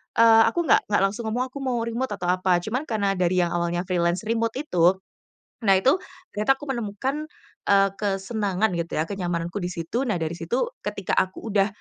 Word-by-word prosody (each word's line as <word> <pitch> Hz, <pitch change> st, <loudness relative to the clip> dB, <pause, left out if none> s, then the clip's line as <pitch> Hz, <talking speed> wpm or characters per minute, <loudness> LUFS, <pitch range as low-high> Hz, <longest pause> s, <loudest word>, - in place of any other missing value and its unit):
eee, 225 Hz, -1 st, +7 dB
aku -, -, 0 dB
nggak -, -, +4 dB
nggak 205 Hz, -, +3 dB
langsung 205 Hz, +4 st, -1 dB
ngomong, 245 Hz, +4 st, -1 dB
"Aku 280 Hz, -, -7 dB
mau 250 Hz, -2 st, 0 dB
remote," 235 Hz, +2 st, -3 dB
atau 180 Hz, -3 st, -4 dB
apa 180 Hz, -1 st, +2 dB
cuman 245 Hz, +8 st, -2 dB
karena 205 Hz, -3 st, 0 dB
dari 180 Hz, 0 st, +2 dB
yang 170 Hz, -, -1 dB
awalnya 175 Hz, 0 st, -1 dB
freelance 175 Hz, 0 st, 0 dB
remote 230 Hz, 0 st, 0 dB
itu, 180 Hz, -, +3 dB, 0.7 s
nah 195 Hz, -2 st, +5 dB
itu 260 Hz, -, +3 dB, 0.3 s
ternyata 215 Hz, +6 st, +2 dB
aku 290 Hz, -, -8 dB
menemukan, 260 Hz, +6 st, -3 dB, 0.4 s
eee, 195 Hz, 0 st, +5 dB
kesenangan 200 Hz, 0 st, 0 dB
gitu 170 Hz, 0 st, -4 dB
ya, 155 Hz, -, +1 dB
kenyamananku 175 Hz, -1 st, -3 dB
di 175 Hz, -, -2 dB
situ. 175 Hz, +9 st, -2 dB
Nah 215 Hz, -, +1 dB
dari 160 Hz, -1 st, -2 dB
situ 240 Hz, -, -1 dB
ketika -, -, -4 dB
aku 190 Hz, +4 st, -3 dB
udah 200 Hz, -1 st, +3 dB
200 Hz, 190 wpm, -24 LUFS, 180-230 Hz, 0.7 s, eee